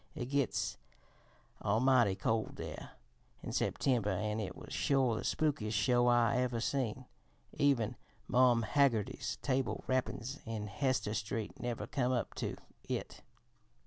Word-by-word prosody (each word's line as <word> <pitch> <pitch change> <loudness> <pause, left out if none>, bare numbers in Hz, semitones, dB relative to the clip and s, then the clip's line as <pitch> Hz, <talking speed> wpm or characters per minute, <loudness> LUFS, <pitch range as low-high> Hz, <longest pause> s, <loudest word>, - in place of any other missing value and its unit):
It 130 -3 -5
gits 140 -3 0 0.8
almighty 115 -1 +4
cold 110 +2 -1
there - - -7 0.5
in - - -4
September, 120 -6 +1
an' 105 +3 -1
it 95 -4 -4
was - - -10
sure 135 -4 +2
the - - -3
spookiest 120 -9 0
show 120 +2 +3
I 120 -1 +4
ever 125 -2 0
seen. 130 0 -1 0.5
Even 135 -7 +2 0.3
Marm 125 -2 +4
Haggerty's 125 -5 +1
table 130 -5 0
rappin's 130 +1 -1
in 110 -2 -4
Hester 130 -1 0
Street 105 +1 -3
never 120 -2 -3
come 125 -2 0
up 125 -3 -1
to - - -3 0.3
it. - - -4
120 Hz, 130 wpm, -34 LUFS, 110-130 Hz, 0.8 s, almighty